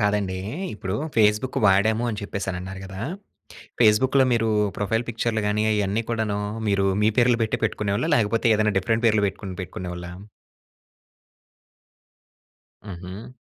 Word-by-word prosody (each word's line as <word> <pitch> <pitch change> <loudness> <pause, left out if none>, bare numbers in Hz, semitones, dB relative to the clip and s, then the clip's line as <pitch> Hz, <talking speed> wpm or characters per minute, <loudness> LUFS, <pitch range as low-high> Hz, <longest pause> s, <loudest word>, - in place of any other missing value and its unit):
కాదండి. 105 -2 0 0.4
ఇప్పుడు 100 -3 -4 0.2
ఫేస్‌బుక్ 105 +3 +2
వాడాము 110 +4 +3
అని 105 - -5
చెప్పేసనన్నారు 95 -2 -5
గదా! 95 0 -8 0.8
ఫేస్‌బుక్‌లో 130 +5 +5
మీరు 115 -1 +1 0.3
ప్రొఫైల్ 115 +3 0
పిక్చర్‌లుగాని 110 -2 0
ఐయన్నీ 105 +2 0
కూడాను, 110 -3 -1 0.3
మీరు 100 -1 +2 0.2
మీ 110 - +5
పేర్లు 120 -1 +4
పెట్టే 110 - -1
పెట్టుకునేవాళ్లా? 105 +7 -1
లేకపోతే 115 -1 +1
ఏదైనా 105 0 +1
డిఫరెంట్ 115 +4 0
పేర్లు 110 -2 +3
పెట్టుకొని 95 -1 -6
పెట్టుకునేవాళ్లా? 90 -1 -6 2.7
హుహు. 95 +3 -9
105 Hz, 110 wpm, -24 LUFS, 95-115 Hz, 2.7 s, ఫేస్‌బుక్‌లో